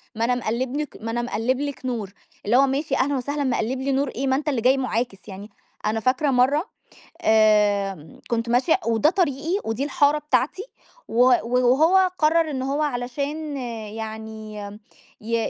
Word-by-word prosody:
ما 225 - 0
أنا 250 +1 +1
مقلِّب 245 +3 -2
لِك 300 -1 -4
ما 225 +1 -4
أنا 240 +1 -1
مقلِّب 245 +2 -1
لِك 285 -2 -5
نور 220 -6 -3 0.3
اللي 230 +5 +3
هو 275 - +5
ماشي 275 +2 -1
أهلًا 280 +2 +1
وسهلًا 285 +3 -2
مقلِّب 255 -1 -1
لي 275 +1 -1
نور 275 +1 +1
إيه، 270 +3 -3
ما 265 - +2
أنت 295 +2 -1
اللي 260 -5 -1
جاي 255 +3 +4
مُعاكس 235 -5 -3
يعني، 200 +2 -9 0.4
أنا 215 +1 0
فاكرة 255 +5 +1
مرّه 270 +6 +3 0.6
آمم، 205 -6 +2
كنت 235 0 -1
ماشية 260 +10 +3
وده 230 +7 +3
طريقي 340 0 0
ودي 225 +4 -2
الحارة 285 +1 +2
بتاعتي، 295 +5 0 0.4
و 235 +2 +3 0.2
وهو 285 +10 +3
قرّر 315 +1 +3
إن 265 -3 -3
هو 275 +3 -1
علشان 285 +3 -3 0.3
يعني 220 0 -7 0.7
ي 230 +2 -2
255 Hz, 165 wpm, -23 LUFS, 225-285 Hz, 0.7 s, هو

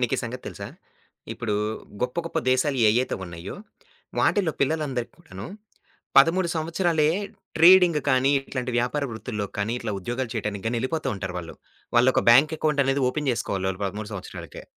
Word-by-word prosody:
నీకీ 125 -2 +1
సంగతి 125 +1 -6
తెలుసా? - - -6 0.7
ఇప్పుడు 110 -3 -3 0.5
గొప్ప 125 0 -2
గొప్ప 165 - -2
దేశాలు 130 +2 +1
ఏయ్యతే 120 +4 +1
ఉన్నయో, 85 +1 -8 0.6
వాటిల్లో 185 -6 +2
పిల్లలందరికీ 135 -5 -1
కూడాను 95 +1 -9 0.7
13 170 +6 +4
సంవత్సరాలే 165 -1 +1 0.5
ట్రేడింగ్ 175 -1 +7
కానీ, 130 0 +3
ఇట్లాంటి 130 -2 -4
వ్యాపార 125 +5 0
వృత్తుల్లో 110 -2 -4
కానీ, 105 +2 0
ఇట్లా 115 -3 -4
ఉద్యోగాలు 120 +5 -3
చేయటానికి 100 -2 -3
గానీ, 115 +2 0
ఎళ్ళిపోతా 135 +2 -2
ఉంటారు 95 -2 -5
వాళ్ళు. 85 -2 -8 0.4
వాళ్ళొక 125 +2 +4
బ్యాంక్ 140 +7 +6
అకౌంట్ 150 -2 +2
అనేది 135 +1 +1
ఓపెన్ 150 +1 -3
జేసుకోవాలి 95 -5 -2
వాళ్ళు 95 +2 -6
13 105 +2 -6
సంవత్సరాలకే. 95 - -8
125 Hz, 145 wpm, -25 LUFS, 110-150 Hz, 0.7 s, ట్రేడింగ్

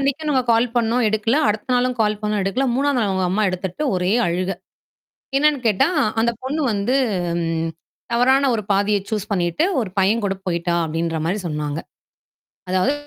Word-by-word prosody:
அன்னைக்கும் 280 +3 -1
நாங்க 260 -3 +2
கால் 230 +2 +3
பண்ணோம் 240 +1 +2
எடுக்கல. 220 +4 +1
அடுத்த 215 +4 -2
நாளும் 250 0 +1
கால் 210 -1 +1
பண்ணோம் 210 -1 0
எடுக்கல. 235 +8 0
3ஆம் 280 0 +1
நாள் 210 -4 +1
அவங்க 190 -1 0
அம்மா 210 +3 +1
எடுத்துட்டு 185 - -4
ஒரே 180 +1 0
அழுகை. 180 +2 -1 0.8
என்னன்னு 295 0 +3
கேட்டா, 210 - +3 0.3
"அந்தப் 235 0 0
பொண்ணு 290 +4 -2
வந்து 210 +6 0 0.4
ம் 165 -1 -1 0.4
தவறான 260 +3 +3
ஒரு 220 - -1
பாதையை 200 +1 +2
சூஸ் 215 -1 -3
பண்ணீட்டு 175 - +1 0.2
1 215 -6 -3
பையன் 210 +4 +2
கூடப் 195 -1 -3
போயிட்டா." 170 -1 0
அப்படீன்ற 165 0 -2
மாரி 195 +5 -1
சொன்னாங்க. 150 -1 -3 0.9
அதாவது 185 +9 +2
210 Hz, 165 wpm, -21 LUFS, 185-245 Hz, 0.9 s, கால்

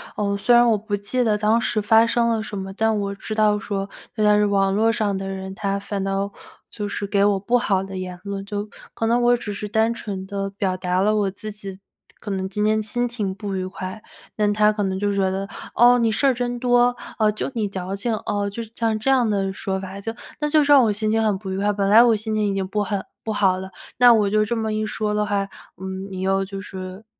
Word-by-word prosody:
呃 200 -1 0
虽 240 +4 +4
然 240 0 +6
我 220 - +3
不 205 0 -3
记 205 +5 -1
得 215 -3 +2
当 215 +2 +3
时 220 -1 0
发 225 +2 +5
生 235 0 +2
了 225 -1 0
什 210 -1 -6
么， 190 0 -5
但 220 +2 +1
我 200 0 -3
知 215 +1 -6
道 210 -1 +3
说 200 -1 -4 0.3
有 215 - 0
的 210 0 +5
是 210 - +3
网 195 -1 +2
络 225 +2 +3
上 210 -3 0
的 195 0 -5
人， 190 0 -5
他 200 -1 -1
反 200 -1 -4
倒 195 +1 -1 0.4
就 210 -2 -5
是 200 - -3
给 200 0 +2
我 205 -1 +2
不 235 +6 +2
好 195 -5 +1
的 195 0 -7
言 180 -1 -6
论， 200 -1 -4
就 205 +1 -4 0.2
可 225 - -2
能 240 +2 +2
我 240 0 +4
只 210 -3 -5
是 210 +1 -5
单 220 +2 +2
纯 200 -4 -6
地 195 0 -3
表 195 -1 -2
达 180 0 0
了 210 +2 +3
我 205 -2 +1
自 215 +2 -7
己 195 -2 -8 0.4
可 205 - -6
能 190 -1 -2
今 210 +2 -1
天 215 0 +2
心 240 +3 -1
情 215 -5 -3
不 200 0 -4
愉 185 -1 -2
快， 185 +2 -7 0.3
但 210 -1 +2
他 210 0 +4
可 210 -1 -2
能 190 -1 -1
就 205 0 0
觉 195 -1 +1
得， 195 +1 -3 0.3
哦， 245 +1 +6
你 230 -1 +2
事 245 - 0
儿 265 - +4
真 245 0 -2
多， 245 0 +3 0.2
呃， 215 -1 +4
就 210 - -3
你 220 -4 -1
矫 190 0 -4
情， 225 +4 -2
哦， 205 0 -1
就 230 +4 -5
是 220 - -13
像 225 -2 0
这 220 +5 -1
样 250 -4 +3
的 195 -2 0
说 190 -1 -3
法。 190 +1 -7
就 225 +3 -4 0.3
那 300 0 0
就 305 0 +4
是 290 - +1
让 280 -3 +8
我 220 - +3
心 215 +1 -1
情 225 0 +2
很 210 -3 +1
不 190 -1 -6
愉 190 - -2
快， 205 +1 +1
本 200 -1 0
来 220 +3 +8
我 235 -2 +4
心 215 +1 -3
情 210 -1 +1
已 200 - 0
经 190 -1 -2
不 210 +2 -1
很 200 -1 -3 0.2
不 220 - -3
好 195 -3 +2
了， 190 0 -7 0.3
那 245 0 +8
我 210 -2 +2
就 215 0 +3
这 230 +2 -2
么 220 -1 -1
一 215 0 -1
说 210 0 -2
的 210 0 0
话， 200 -1 0 0.3
嗯， 190 0 -5
你 185 -1 -5
又 195 +1 +1
就 195 0 -6
是 190 +1 -8
205 Hz, 280 characters per minute, -22 LUFS, 195-220 Hz, 0.4 s, 让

